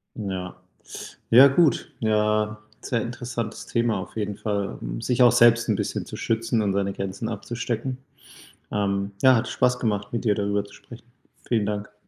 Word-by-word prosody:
Ja. 95 Hz, -4 st, -5 dB, 0.8 s
Ja 130 Hz, +4 st, +9 dB
gut, 155 Hz, +3 st, +2 dB
ja, 105 Hz, -1 st, +1 dB, 0.2 s
sehr 115 Hz, -3 st, -1 dB
interessantes 120 Hz, -1 st, -5 dB
Thema 115 Hz, -3 st, +1 dB
auf 95 Hz, -, -9 dB
jeden 105 Hz, -1 st, -3 dB
Fall, 100 Hz, -2 st, -2 dB
hm, -, -, -5 dB
sich 125 Hz, 0 st, 0 dB
auch 120 Hz, -, +7 dB
selbst 120 Hz, -1 st, +5 dB
'n 105 Hz, -, +3 dB
bisschen -, -, -3 dB
zu -, -, -7 dB
schützen 115 Hz, 0 st, 0 dB
und 100 Hz, -1 st, 0 dB
seine 100 Hz, 0 st, -1 dB
Grenzen 100 Hz, +4 st, -4 dB
abzustecken. 120 Hz, +3 st, -4 dB, 0.7 s
Ähm, 100 Hz, -1 st, -1 dB
ja 130 Hz, -2 st, +7 dB
hat 115 Hz, -, 0 dB
Spaß 125 Hz, 0 st, +1 dB
gemacht, 105 Hz, -2 st, -2 dB
mit 120 Hz, -, -3 dB
dir 105 Hz, -2 st, +3 dB
darüber 100 Hz, 0 st, -1 dB
zu 100 Hz, -, -15 dB
sprechen. 120 Hz, 0 st, -14 dB, 0.4 s
Vielen 110 Hz, -4 st, +1 dB
Dank. 105 Hz, -1 st, -4 dB
110 Hz, 170 wpm, -24 LUFS, 100-120 Hz, 0.8 s, Ja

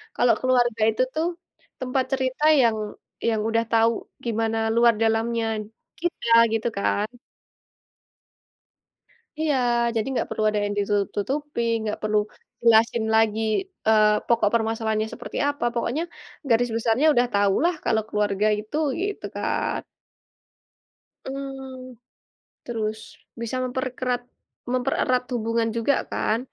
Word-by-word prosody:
kalau 240 Hz, -1 st, +4 dB
keluarga 245 Hz, -3 st, +2 dB
itu 225 Hz, +4 st, +1 dB
tuh, 320 Hz, +2 st, +1 dB, 0.5 s
tempat 255 Hz, 0 st, 0 dB
cerita 260 Hz, +2 st, -1 dB, 0.2 s
yang 230 Hz, -3 st, +3 dB, 0.5 s
yang 220 Hz, -2 st, 0 dB
udah 230 Hz, 0 st, +2 dB
tahu 225 Hz, 0 st, +4 dB, 0.3 s
gimana 225 Hz, -1 st, 0 dB, 0.2 s
luar 235 Hz, 0 st, +5 dB
dalamnya 225 Hz, +1 st, +1 dB, 0.6 s
kita 345 Hz, -8 st, -2 dB, 0.2 s
gitu 225 Hz, +1 st, 0 dB
kan. 205 Hz, +1 st, +1 dB, 2.3 s
Iya, 310 Hz, -2 st, +1 dB, 0.4 s
jadi 220 Hz, -, 0 dB
nggak -, -, -1 dB
perlu 220 Hz, 0 st, -2 dB
ada 210 Hz, -1 st, +1 dB
yang 205 Hz, -, -1 dB
ditutup-tutupin, 230 Hz, +5 st, -1 dB
nggak 210 Hz, -1 st, -3 dB
perlu 215 Hz, 0 st, +1 dB, 0.5 s
jelasin 230 Hz, 0 st, +4 dB
lagi, 220 Hz, -1 st, +3 dB, 0.5 s
eee, 215 Hz, -1 st, +4 dB
pokok 230 Hz, -3 st, +3 dB
permasalahannya 220 Hz, -1 st, 0 dB
seperti -, -, -7 dB
apa 285 Hz, -3 st, -2 dB
pokoknya, 245 Hz, +6 st, -1 dB, 0.5 s
garis 240 Hz, +1 st, +3 dB
besarnya 230 Hz, +5 st, +2 dB
udah 245 Hz, 0 st, +3 dB
tahulah 205 Hz, -, +3 dB
kalau 220 Hz, -1 st, +2 dB
keluarga 210 Hz, 0 st, +1 dB
itu 220 Hz, +8 st, -5 dB, 0.2 s
gitu 405 Hz, +1 st, -3 dB
kan. -, -, -1 dB, 1.4 s
Mmm, 265 Hz, -2 st, -7 dB, 0.7 s
terus, 220 Hz, -2 st, -3 dB, 0.4 s
bisa 235 Hz, +2 st, -3 dB
memperkerat 255 Hz, -1 st, -2 dB, 0.5 s
mempererat 255 Hz, 0 st, +1 dB
hubungan 230 Hz, 0 st, 0 dB
juga 230 Hz, +5 st, +2 dB, 0.2 s
kan, 220 Hz, +1 st, 0 dB
230 Hz, 115 wpm, -24 LUFS, 220-255 Hz, 2.3 s, luar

